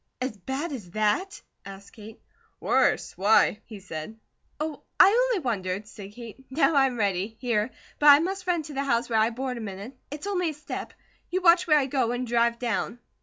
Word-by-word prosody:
"As 255 -2 -3
bad 265 - -4
as 220 -10 -7
THAT?" 215 - 0 0.2
asked 195 0 -11
Kate. 215 0 -12 0.4
"Worse! - - +1
Why?" 210 +1 +3
he 215 -3 -10
said. 185 +3 -8 0.4
"Oh, 305 -1 -4 0.2
I - - +9 0.2
only 440 -10 -1
wondered," 200 -3 -2
said 205 -1 -11
Kate. 235 +2 -11
"Now 310 +4 +2
I 275 -2 +5
am 250 -2 -5
ready, 200 +1 -1
here; 235 -3 0 0.3
but 295 - +3
I 285 -1 +10
must 370 +4 -3
run 345 -3 +1
to 295 - -9
the 275 0 -1
house 235 -2 0
where 220 - +3
I 220 +1 +3
board 250 +1 -4
a - - -6
minute. 205 +4 -7
It's 295 +5 -7
only 365 -4 0
a - - -5
step. 300 - -7 0.4
You 370 +1 -2
watch 340 0 +5
where 305 -2 +5
I 280 - +2
go, 255 -3 0
and 245 +1 -2
drive 235 0 +1
down." 235 -1 -2
240 Hz, 205 wpm, -26 LUFS, 210-295 Hz, 0.4 s, I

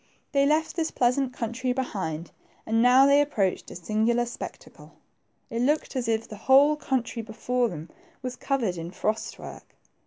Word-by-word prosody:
They 280 0 +3
left 310 +2 +1
this 330 -2 0
pleasant 250 +1 +1
country 250 +1 -2
behind, 185 -11 -4 0.3
and 225 +1 +2
now 250 +2 +7
they 280 +1 +6
approached 205 -10 -1
a - - -9
singular 220 +6 +1
spectacle. 240 - -9 0.6
It 230 +1 -1
looked 295 +3 0
as 250 -2 -1
if 225 0 0
the 210 - -9
whole 275 +7 +5
country 255 -5 -2
before 240 +2 -1
them 160 -2 -7 0.4
was 255 -1 -4
covered 240 -9 -1
with 170 +2 -7
frost 215 +1 -2
work. - - -11
240 Hz, 160 wpm, -26 LUFS, 220-265 Hz, 0.6 s, now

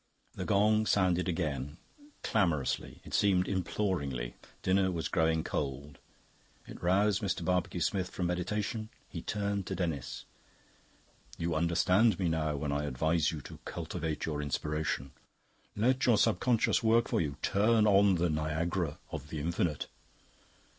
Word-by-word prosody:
The - - -5
gong 110 +2 +3
sounded 90 -2 +2
again, 75 -4 -2 0.5
clamorously, 75 - 0
it - - -10
seemed 95 -3 +3
imploringly: 85 - -2 0.3
dinner 95 0 +3
was 80 -4 -2
growing 80 -1 +1
cold. 70 0 -4 0.7
It - - -11
roused 100 +3 +3
Mr. 95 -4 -2
Barbecue 90 0 0
Smith 90 +2 0
from 90 - -3
meditation. 105 +5 -2 0.2
He - - -6
turned 100 -2 -2
to 95 - -2
Denis. 80 -8 -3 1.1
"You 85 0 -1
understand 90 +6 +3
me 90 -3 0
now 80 -2 0
when 70 0 -2
I 75 +1 -1
advise 80 +4 +1
you 80 -2 -6
to - - -11
cultivate 80 -2 -4
your 75 -2 -2
Inspiration. 75 -1 -2 0.6
Let 125 +5 +2
your 115 -3 +5
Subconscious 115 +2 +2
work 115 +1 +3
for - - +1
you; 70 -3 -2
turn 110 +2 +3
on 100 -2 +5
the 85 -1 +1
Niagara 80 +1 -1
of 75 - -6
the 80 - -5
Infinite." 80 0 -1
85 Hz, 140 wpm, -31 LUFS, 75-100 Hz, 1.1 s, your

